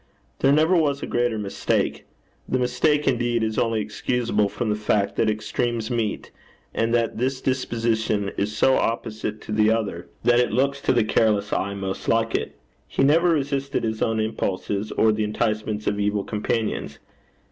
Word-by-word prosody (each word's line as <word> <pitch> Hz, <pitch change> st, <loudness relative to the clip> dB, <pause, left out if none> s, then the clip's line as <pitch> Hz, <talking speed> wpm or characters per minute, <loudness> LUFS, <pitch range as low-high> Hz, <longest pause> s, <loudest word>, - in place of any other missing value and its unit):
There 135 Hz, -, +4 dB
never 155 Hz, +5 st, +4 dB
was 145 Hz, -4 st, +1 dB
a -, -, -1 dB
greater 120 Hz, -2 st, 0 dB
mistake. 100 Hz, -2 st, -1 dB, 0.4 s
The 130 Hz, -, +1 dB
mistake, 145 Hz, +4 st, +1 dB
indeed, 120 Hz, -3 st, +1 dB
is 110 Hz, -1 st, -1 dB
only 115 Hz, -1 st, +1 dB
excusable 105 Hz, 0 st, 0 dB
from 110 Hz, +1 st, -2 dB
the -, -, +1 dB
fact 105 Hz, -1 st, 0 dB
that 110 Hz, -, +2 dB
extremes 115 Hz, +2 st, -2 dB
meet, 115 Hz, -3 st, -2 dB, 0.4 s
and 115 Hz, 0 st, 0 dB
that 115 Hz, -2 st, 0 dB
this 130 Hz, +2 st, 0 dB
disposition 115 Hz, -6 st, 0 dB
is 105 Hz, +1 st, -2 dB
so 130 Hz, -, +4 dB
opposite 110 Hz, -2 st, -2 dB
to -, -, -8 dB
the 105 Hz, 0 st, +3 dB
other, 100 Hz, -9 st, -1 dB
that 120 Hz, 0 st, +4 dB
it 125 Hz, -3 st, +2 dB
looks 140 Hz, +4 st, +1 dB
to -, -, +2 dB
the 120 Hz, -3 st, +3 dB
careless 105 Hz, -1 st, +1 dB
eye 100 Hz, +1 st, -1 dB
most 95 Hz, -1 st, -5 dB
like 115 Hz, 0 st, +2 dB
it. -, -, -2 dB, 0.3 s
He -, -, 0 dB
never 165 Hz, +5 st, +4 dB
resisted 140 Hz, -3 st, 0 dB
his 110 Hz, -1 st, -2 dB
own 110 Hz, 0 st, +1 dB
impulses, 105 Hz, -1 st, -2 dB
or 110 Hz, -, +3 dB
the 110 Hz, 0 st, 0 dB
enticements 105 Hz, 0 st, -1 dB
of 100 Hz, -, 0 dB
evil 105 Hz, 0 st, 0 dB
companions. 110 Hz, +1 st, -2 dB
110 Hz, 170 wpm, -24 LUFS, 105-125 Hz, 0.4 s, There